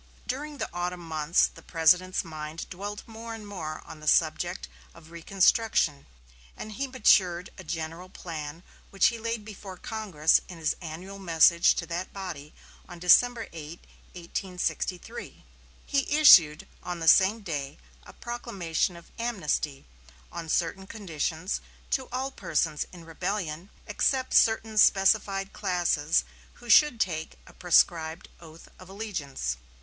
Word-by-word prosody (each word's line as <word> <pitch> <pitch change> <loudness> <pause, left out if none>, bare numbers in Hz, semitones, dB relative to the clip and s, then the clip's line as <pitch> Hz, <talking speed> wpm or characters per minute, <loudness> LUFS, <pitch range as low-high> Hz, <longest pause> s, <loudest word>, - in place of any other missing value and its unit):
During 290 +3 -5
the - - -3
autumn 175 -1 -4
months 155 +1 +2
the - - -14
President's 180 +3 +2
mind 155 0 -7
dwelt 205 +3 -6
more 225 0 -8
and 215 -2 -10
more 155 -6 -6
on 155 - -11
the 155 - -10
subject 60 - +1 0.3
of 160 - -16
reconstruction, 175 -3 +1 0.5
and 215 - -7
he 270 +6 -3
matured 185 -8 +3
a - - -8
general 165 +2 -5
plan 160 -2 -7 0.3
which 195 - +4
he 235 -2 -6
laid 230 -1 -3
before 200 -3 -9
Congress 190 -10 +1
in 180 - -10
his 160 -2 -1
annual 180 +4 -8
message 170 -1 +4
to 165 - -3
that 170 +3 -5
body 170 -7 -7 0.4
on 175 - -9
December 230 +7 +4
8, 160 +1 -8 0.3
1863. 180 +3 -4 0.4
He 275 -2 0
issued 165 - +7
on 175 0 -5
the 165 -1 -4
same 200 +6 +5
day 145 -8 -5 0.2
a - - -14
proclamation 190 -7 -3
of 170 - -14
amnesty, 160 - -2 0.5
on 165 -1 -7
certain 180 +4 -1
conditions, 180 -3 -3 0.3
to 265 - -1
all 260 +2 -2
persons 155 - -1
in 175 -2 -12
rebellion 175 0 -4 0.2
except 260 +5 0
certain 220 -1 +3
specified 195 -1 +3
classes, 170 -3 +1 0.3
who 240 -1 -5
should 295 0 +6
take 160 -6 -2
a - - -16
prescribed 165 -1 +2
oath 165 -1 -14
of 185 0 -13
allegiance. 155 - -4
180 Hz, 135 wpm, -27 LUFS, 160-210 Hz, 0.5 s, issued